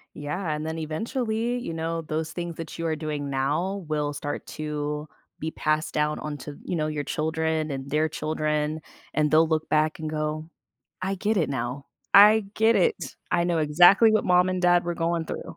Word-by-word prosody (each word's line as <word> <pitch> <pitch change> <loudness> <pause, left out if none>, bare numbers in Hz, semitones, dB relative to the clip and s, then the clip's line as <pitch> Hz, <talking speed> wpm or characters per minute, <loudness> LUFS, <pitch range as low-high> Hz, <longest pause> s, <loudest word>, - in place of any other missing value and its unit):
Yeah, 155 +3 -3
and 150 +1 -4
then 160 0 -3
eventually, 225 - -2
you 165 - -5
know, 165 +1 -2
those 160 0 -3
things 170 -2 -5
that 165 0 -7
you 165 - -3
are 160 -1 0
doing 150 -2 -4
now 160 +8 -1
will 150 -1 -1
start 145 0 -5
to 150 0 -4 0.3
be 160 +1 -3
passed 155 +1 -1
down 150 0 0
onto, 145 -1 -6
you 180 - -3
know, 155 -1 0
your 150 -2 -3
children 160 0 -1
and 135 0 -5
their 155 +2 +1
children, 155 0 -1 0.3
and 150 0 +1
they'll 160 +1 +5
look 160 -1 -1
back 155 0 +1
and 155 -1 -4
go, 155 +1 -3 0.5
"I 195 +1 -1
get 215 +3 0
it 165 - +2
now. 130 +2 -3 0.3
I 210 +1 +8
get 220 +1 +4
it. 460 -3 +3 0.4
I 170 - +3
know 170 -2 +1
exactly 175 +9 +6
what 215 - +2
mom 180 0 +4
and 185 0 -2
dad 175 0 +4
were 175 0 -2
going 165 0 -1
through." - - -6
155 Hz, 195 wpm, -26 LUFS, 150-175 Hz, 0.5 s, I